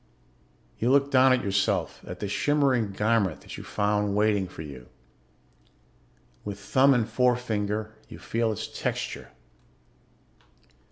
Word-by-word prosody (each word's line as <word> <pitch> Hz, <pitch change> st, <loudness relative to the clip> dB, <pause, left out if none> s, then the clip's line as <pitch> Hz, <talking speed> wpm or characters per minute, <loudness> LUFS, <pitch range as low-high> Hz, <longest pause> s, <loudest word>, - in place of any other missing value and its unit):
You 120 Hz, -, +1 dB
look 140 Hz, +1 st, +3 dB
down 130 Hz, 0 st, +6 dB
at 130 Hz, -1 st, +2 dB
yourself, 100 Hz, 0 st, 0 dB
at 90 Hz, 0 st, -7 dB
the 105 Hz, -, -2 dB
shimmering 130 Hz, -1 st, +1 dB
garment 105 Hz, -4 st, 0 dB
that -, -, -10 dB
you -, -, -8 dB
found 105 Hz, -1 st, 0 dB
waiting 105 Hz, -2 st, +2 dB
for 85 Hz, -3 st, -9 dB
you. 70 Hz, -5 st, -11 dB, 1.5 s
With 100 Hz, -1 st, -5 dB
thumb 135 Hz, +6 st, +4 dB
and 115 Hz, -3 st, +1 dB
forefinger 110 Hz, -3 st, 0 dB, 0.2 s
you -, -, -9 dB
feel 115 Hz, -1 st, -1 dB
its 105 Hz, -, -4 dB
texture. -, -, -4 dB
110 Hz, 125 wpm, -26 LUFS, 100-125 Hz, 1.5 s, down